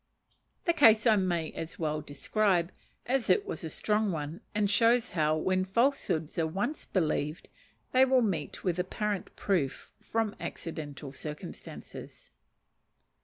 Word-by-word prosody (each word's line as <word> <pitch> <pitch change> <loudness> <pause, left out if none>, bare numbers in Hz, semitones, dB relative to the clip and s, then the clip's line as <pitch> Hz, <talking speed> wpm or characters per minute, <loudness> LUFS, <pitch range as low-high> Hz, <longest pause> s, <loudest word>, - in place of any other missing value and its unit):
The 340 - +4
case 225 -9 +6
I 225 -2 +6
may 175 -5 0
as 165 0 -6
well 155 -2 -1
describe, 175 +4 +1 0.3
as 255 -1 0
it 415 - +4
was 410 - -5
a 160 - -3
strong 210 +4 +1
one, 155 0 -4
and 210 -1 +2
shows 230 +3 +3
how, 155 -2 +2
when 185 +3 +1
falsehoods 190 - 0
are 160 - +2
once 200 - -2
believed, 155 -3 -1 0.4
they 260 +1 +6
will 260 -1 +4
meet 170 -9 -2
with 180 -2 0
apparent 200 +2 -2
proof 170 -10 -1
from 225 -2 -1
accidental 145 -4 -6
circumstances. 150 +1 -9
185 Hz, 135 wpm, -30 LUFS, 160-220 Hz, 0.4 s, case